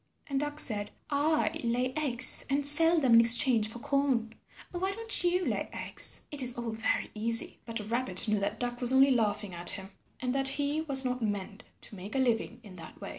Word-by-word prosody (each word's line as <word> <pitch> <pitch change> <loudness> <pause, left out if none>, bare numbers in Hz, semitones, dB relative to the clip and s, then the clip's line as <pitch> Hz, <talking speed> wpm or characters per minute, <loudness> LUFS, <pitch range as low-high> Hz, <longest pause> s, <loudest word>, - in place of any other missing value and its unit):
And 275 -2 -4
Duck 295 +1 -6
said, 210 -7 -4 0.2
"I 310 +2 -2
lay 250 +2 -3
eggs 260 -5 +5
and 280 +1 -1
sell 325 +3 +5
them 260 -5 +1
in 230 - +6
exchange 230 -1 +5
for 230 - -9
corn. 245 -3 -3 0.4
Why 375 +2 -4
don't 450 -2 -3
you 360 +1 -1
lay - - -4
eggs? - - +1
It 290 -2 0
is 250 -1 +3
all 235 -1 -6
very 220 0 -4
easy." 230 +2 0
But 225 -2 -6
Rabbit 230 -4 0
knew 210 -1 -1
that 205 +2 -5
Duck 245 0 -3
was 245 0 +5
only 270 +1 +3
laughing 210 -5 -2
at 175 0 0
him, 195 0 -5 0.3
and 250 -1 -4
that 270 0 +1
he 285 +3 -2
was 275 -4 +2
not 250 0 -4
meant 205 0 -6 0.2
to 215 - -11
make 195 +6 -11
a - - -1
living 240 -2 -2
in 190 -4 -15
that 165 - -14
way. - - -9
245 Hz, 210 wpm, -27 LUFS, 220-280 Hz, 0.4 s, in